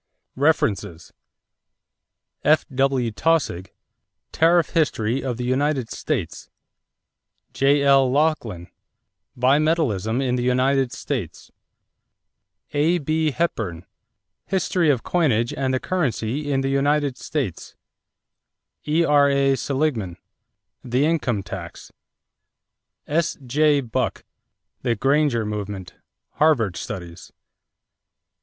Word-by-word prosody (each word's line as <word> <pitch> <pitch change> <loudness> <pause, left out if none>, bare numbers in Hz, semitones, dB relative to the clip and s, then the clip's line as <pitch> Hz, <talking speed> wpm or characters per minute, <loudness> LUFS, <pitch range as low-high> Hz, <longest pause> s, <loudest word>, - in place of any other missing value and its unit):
=References= 105 - 0 1.3
F.W. 135 -5 +2
Taussig, 110 - 0 0.6
Tariff 170 +1 +3
History 135 -6 0
of 125 -3 -3
the 125 - -4
United 130 -1 0
States. 120 - -4 1.0
J.L. 140 -1 +4
Laughlin, 130 - 0 0.7
Bimetallism 130 - +1
in 125 -2 0
the - - -1
United 130 +1 +1
States. 105 - -5 1.2
A.B. 155 +1 +1
Hepburn, 110 - -2 0.6
History 180 -3 +1
of 130 -5 +1
Coinage 125 -10 +1
and 130 -1 -1
Currency 145 - -1
in 135 -1 +1
the 135 - -1
United 140 0 +1
States. 130 - -4 1.1
E.R.A. 140 -3 +3
Seligman, 130 - -2 0.7
The 125 +4 +1
Income 130 -11 0
Tax. - - -8 1.1
S.J. 150 -2 +1
Buck, 120 -4 -2 0.6
The 120 -2 0
Granger 135 -1 +1
Movement 105 -3 -5 0.4
(Harvard 120 - +2
Studies). 90 -3 -7
135 Hz, 80 wpm, -22 LUFS, 115-150 Hz, 1.3 s, J.L